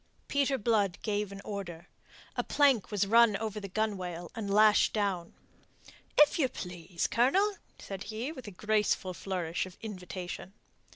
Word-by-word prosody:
Peter 280 -1 +1
Blood 205 -5 +1
gave 210 -2 -1
an 200 0 -8
order. 175 -4 -6 0.5
A - - 0
plank 275 -8 +3
was 205 -2 +1
run 230 0 +5
out 195 - -4
over 215 -1 -3
the 200 - -6
gunwale, 185 -5 -3
and 205 -3 -4
lashed 210 +1 +5
down. 195 -5 -1 0.8
"If 295 +2 +6
you 265 -4 +3
please, 175 -4 -4
Colonel," 380 - +3 0.2
said 195 0 -7
he, 225 +7 -4
with 260 -8 -9
a - - -4
graceful 210 -1 0
flourish 180 -2 -3
of 185 - -14
invitation. 185 -2 -6
205 Hz, 155 wpm, -31 LUFS, 185-225 Hz, 0.8 s, If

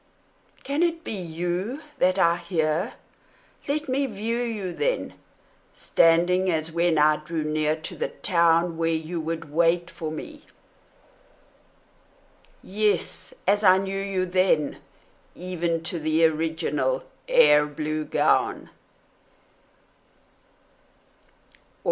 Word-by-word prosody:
Can 285 +3 -1
it 335 -1 0
be - - -5
you 180 - -3 0.2
that 185 +1 +3
I 170 -2 +3
hear? 170 +3 -1 0.7
Let 300 +2 -1
me 270 +1 0
view 225 +1 -3
you, 215 -7 -3
then, - - -1 0.6
Standing 175 +3 +3
as 160 -1 -1
when 170 0 +1
I 150 0 +4
drew 155 +1 -4
near 155 0 0
to - - -7
the - - -2
town 170 -1 +1
Where 165 0 0
you 165 +1 -2
would 160 -1 -5
wait 170 +1 +2
for 155 -2 -5
me: 300 - -8 2.2
yes, 210 - -1
as 205 +1 +3
I 185 -1 +7
knew 195 0 -3
you 195 -2 -1
then, 185 -5 +1 0.6
Even 170 -2 -2
to 170 +1 -4
the 155 +1 +2
original 160 - 0 0.2
air 485 - +5
blue 155 +1 -3
gown! - - +1
175 Hz, 110 wpm, -25 LUFS, 160-200 Hz, 2.2 s, I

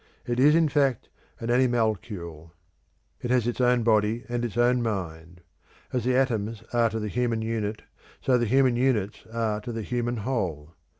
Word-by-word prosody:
It 120 0 -1
is 150 +4 +6
in 165 -1 +4
fact 135 -5 +1 0.3
an 115 +1 -2
animalcule. 105 -10 -1 0.7
It 120 - -4
has 125 -2 +2
its 120 +1 -1
own 125 -1 +3
body 110 +1 +2
and 120 0 -2
its 120 -2 -4
own 120 +1 +3
mind. 90 -6 -4 0.5
As 125 -3 -1
the 125 0 +2
atoms 115 -4 0
are 120 -1 +3
to 110 0 -3
the 105 - -3
human 115 0 -1
unit, 110 -1 -3 0.4
so 125 -2 +2
the 120 - 0
human 130 +1 +3
units 120 -6 0
are 110 -2 -1
to 120 - -6
the 115 -1 -4
human 120 +1 -2
whole. 85 - -2
115 Hz, 175 wpm, -26 LUFS, 105-125 Hz, 0.7 s, is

